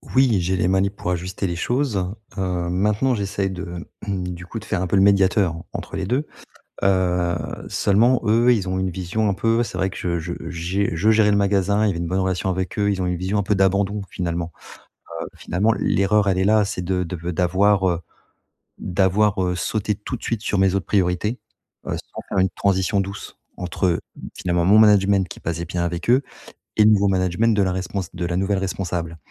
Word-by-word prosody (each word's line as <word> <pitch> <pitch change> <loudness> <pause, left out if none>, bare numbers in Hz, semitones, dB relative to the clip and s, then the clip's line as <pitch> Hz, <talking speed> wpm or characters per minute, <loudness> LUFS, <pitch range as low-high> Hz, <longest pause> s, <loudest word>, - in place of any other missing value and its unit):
Oui, 125 -8 +4
j'ai 95 +2 0
les 90 - +1
manips 95 +1 +1
pour 90 - -3
ajuster 90 +2 -3
les 85 - -3
choses. 105 -4 -1 0.2
Heu, 90 -2 -1
maintenant, 105 +8 +1
j'essaye 100 -1 -2
de 90 -2 -7 0.2
du 90 -2 -4
coup, 115 +5 -6
de 110 - -13
faire 95 -4 -1
un 95 - -1
peu 100 - 0
le 95 - +5
médiateur 95 -3 +3 0.2
entre - - -6
les 95 - -2
2. 130 +8 0 0.6
Heu, 90 -2 +2 0.3
seulement 115 +5 +3
eux, 115 +3 +4
ils 100 -5 0
ont 95 0 -1
une 95 0 -1
vision 95 +5 -1
un 100 - +1
peu 115 +3 +1
c'est - - -5
vrai 95 0 0
que - - -10
je 85 -1 -1
je 85 +2 -5 0.2
j'ai 90 +4 -1
je 100 +7 +3
gérais 110 -1 +4
le 100 - +3
magasin, 100 +1 +2
il - - +3
y - - +2
avait 85 - -3
une 85 - -2
bonne 95 +2 0
relation 95 0 -1
avec 95 +2 -3
eux. 100 0 +2
Ils 95 - -1
ont - - -1
une 90 - -1
vision 95 +4 -1
un - - +2
peu 100 +1 +1
d'abandon, 100 +2 +1
finalement. 85 -2 -3 0.7
Heu, - - -5
finalement, 105 +5 0
l'erreur, 100 +1 +2
elle 95 -1 +1
est 95 - +2
là, 105 +1 +4
c'est 100 -2 -4
de 90 0 -1
de 90 +2 -5
v 85 +2 -4
d'avoir, 95 +3 +2
heu, 85 -1 0 0.8
d'avoir, 95 +2 +1
heu, 90 0 0
sauté 105 +3 -1
tout 105 +5 -5
de - - -18
suite 115 -2 -2
sur 100 - -1
mes 95 0 +3
autres 100 - -1
priorités, 100 +4 0 0.5
heu, - - -2
sans - - -9
faire 95 - -2
une 95 0 +3
transition 100 +1 +1
douce, 100 +1 -6 0.2
entre, 90 +1 -2
heu, 85 - +1 0.3
finalement, 85 -1 0
mon 100 +4 +6
management 100 -3 +5
qui - - -10
passait 85 0 -3
bien 85 0 -3
avec 85 +4 -4
eux 130 +3 +5 0.5
et 105 - +5
le 110 - +6
nouveau 100 -1 +4
management 95 +4 +2
de 100 - +3
la 95 - 0
respons 95 +1 -3
de 90 -1 -3
la 85 - -2
nouvelle 95 0 0
responsable 90 -3 -3
95 Hz, 220 wpm, -22 LUFS, 90-105 Hz, 0.8 s, mon